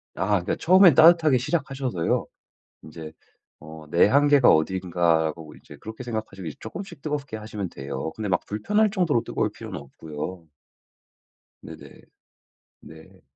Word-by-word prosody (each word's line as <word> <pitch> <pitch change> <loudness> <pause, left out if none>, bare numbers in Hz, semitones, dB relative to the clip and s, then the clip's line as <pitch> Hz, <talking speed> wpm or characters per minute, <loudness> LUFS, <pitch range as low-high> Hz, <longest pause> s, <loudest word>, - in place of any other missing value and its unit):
아. 95 - -2
그러니까 100 -4 0
처음엔 185 0 +6
따뜻하게 160 -4 +6
시작하셔서요. 130 - -2 0.6
인제 80 0 -10 0.5
어 80 0 -12
내 85 - +5
한계가 140 +2 +4
어딘가 85 -1 +1
보고 75 -2 -12
이제 - - -15
그렇게 110 +3 -9
생각하시고 110 -6 -6
이 75 - -7
쪼끔씩 185 - -9
뜨겁게 145 -6 -4
하시면 105 -3 -6
돼요. 70 +3 -6
근데 110 -1 -4
막 95 - 0
불편할 210 - +1
정도로 175 - 0
뜨거울 - - -2
필요는 - - -8
없고요. 80 +5 -8 1.1
네네. - - -13 0.8
네. 80 0 -16
105 Hz, 330 characters per minute, -24 LUFS, -, 1.1 s, 처음엔